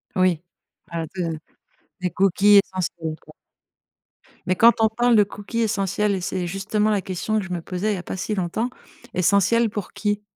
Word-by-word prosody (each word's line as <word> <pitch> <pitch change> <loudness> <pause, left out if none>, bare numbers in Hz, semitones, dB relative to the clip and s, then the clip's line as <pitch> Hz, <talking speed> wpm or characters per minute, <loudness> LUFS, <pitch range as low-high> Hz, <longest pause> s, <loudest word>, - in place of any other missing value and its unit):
Oui. 185 -3 +2 0.5
Ah 165 -1 -3
de 165 -3 -2 0.6
des 180 - 0
cookies 195 +2 +5
essentiels, 170 -4 -4
quoi - - -16 1.1
mais 185 -1 +1
quand 230 +5 +7
on 220 - +5
parle 240 +1 +2
de 210 - +6
cookies 205 +3 -6
essentiels 205 -1 0
et 185 - -4
c'est 180 0 -2
justement 210 +4 0
la 205 -2 +1
question 195 +4 -2
que 195 - -4
je 185 - -9
me 170 - -3
posais, 190 +5 -2
il - - 0
y - - -5
a 180 - -6
pas - - -5
si 210 +3 -2
longtemps, 195 +7 -1 0.4
essentiels 200 +5 +3
pour 205 -3 -6
qui? 205 0 -1
195 Hz, 185 wpm, -23 LUFS, 180-215 Hz, 1.1 s, quand